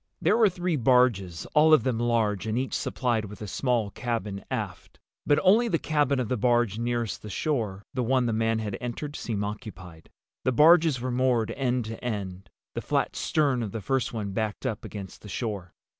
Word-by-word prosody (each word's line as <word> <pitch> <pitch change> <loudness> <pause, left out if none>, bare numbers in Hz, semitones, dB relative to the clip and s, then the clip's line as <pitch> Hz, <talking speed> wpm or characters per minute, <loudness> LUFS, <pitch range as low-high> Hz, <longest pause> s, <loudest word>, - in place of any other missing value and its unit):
There - - +3
were 225 -3 +5
three 180 -3 -1
barges, 115 -9 +2
all 155 +1 +7
of 125 - 0
them 125 -3 0
large 115 -3 +1
and 110 +1 -1
each 130 +1 -2
supplied 120 -4 -1
with 105 +1 -10
a 105 - -6
small 115 0 0
cabin 105 -5 -3
aft. - - -5 0.3
But 145 - +4
only 215 +6 +5
the 170 - +1
cabin 145 -4 +1
of 125 - -1
the 125 - -1
barge 120 -1 +2
nearest 120 -1 -2
the 105 - -8
shore—the 110 -2 -2
one 125 +1 +2
the 115 - 0
man 115 0 +1
had 105 -3 -3
entered—seemed 120 -4 -4
occupied. 100 -6 -8 0.3
The 130 - +1
barges 160 0 +6
were 130 +1 -3
moored 125 -3 +1
end 125 -3 -1
to 110 +2 -7
end, 100 -5 -4 0.2
the - - -3
flat - - -1
stern 140 -5 +1
of 105 -4 -4
the 115 - -3
first 135 +5 0
one 105 -4 -4
backed 110 +1 -3
up 105 - -2
against 100 -3 -8
the 105 - -11
shore. 100 -5 -4
120 Hz, 190 wpm, -27 LUFS, 105-130 Hz, 0.3 s, all